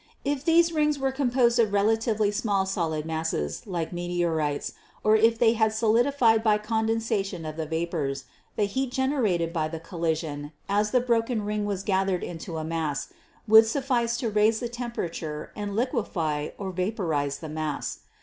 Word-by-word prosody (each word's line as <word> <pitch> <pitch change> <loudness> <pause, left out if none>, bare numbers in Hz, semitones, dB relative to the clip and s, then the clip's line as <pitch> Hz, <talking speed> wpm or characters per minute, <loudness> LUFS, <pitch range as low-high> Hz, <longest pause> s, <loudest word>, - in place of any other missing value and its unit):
If 285 -1 -1
these 335 +1 +4
rings 300 -1 +2
were 270 -1 0
composed 245 -3 +2
of 215 -3 +3
relatively 215 0 +2
small 205 -3 0
solid 165 -5 -2
masses, 160 - -3
like 175 -3 -3
meteorites, 170 -4 -1 0.3
or 215 0 +5
if 225 +1 +4
they 225 -1 +4
had 220 -1 +2
solidified 230 +1 +3
by 215 -2 +4
condensation 220 -4 -1
of 155 0 -5
the 160 -1 -4
vapors, 160 -4 -2 0.3
the 210 - +1
heat 260 +6 -1
generated 240 - 0
by 155 -3 0
the 160 +1 -6
collision, 160 -3 -3
as 205 +1 +1
the 250 +3 +3
broken 230 -2 0
ring 210 0 -1
was 200 -2 -2
gathered 190 -2 +1
into 165 0 -6
a 160 - -3
mass, 160 -3 -3 0.3
would 220 +1 +8
suffice 235 -2 0
to 235 -3 -2
raise 215 +1 +3
the 240 - -3
temperature 175 -11 -5
and 205 -1 -4
liquefy 185 - -1
or 195 -2 -4
vaporize 170 -7 -1
the 160 - -8
mass. 155 -1 -3
205 Hz, 160 wpm, -26 LUFS, 165-230 Hz, 0.3 s, would